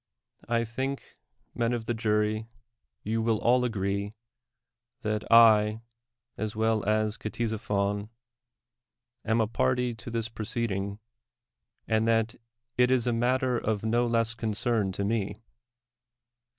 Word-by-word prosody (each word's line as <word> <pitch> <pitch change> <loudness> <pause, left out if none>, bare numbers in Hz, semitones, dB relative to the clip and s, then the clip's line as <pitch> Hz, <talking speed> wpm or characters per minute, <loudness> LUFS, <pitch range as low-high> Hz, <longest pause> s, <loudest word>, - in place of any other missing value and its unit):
I 115 0 +2
think, 130 +4 -4 0.4
men 115 +1 0
of 115 -2 -3
the 120 - -1
jury, 110 0 0 0.6
you 110 +2 -1
will 110 -1 +2
all 125 +3 +3
agree 100 -2 -2 0.9
that 110 -1 -1
I, 110 -1 +6 0.6
as 110 0 -3
well 110 -1 +1
as 110 +1 +1
Ctesiphon, 105 -2 -2 1.1
am 110 +1 +1
a 110 - +3
party 125 +1 0
to 115 - -9
this 115 -1 -2
proceeding, 110 -3 -3 0.9
and 110 0 +2
that 115 0 +2 0.5
it 125 0 +5
is 130 -2 +2
a 120 - +1
matter 125 +1 +1
of 110 -1 -2
no 120 +2 +2
less 115 -1 +1
con 115 -2 -3
cern 110 -2 +1
to 100 - -2
me. 105 0 -2
110 Hz, 125 wpm, -28 LUFS, 105-120 Hz, 1.1 s, I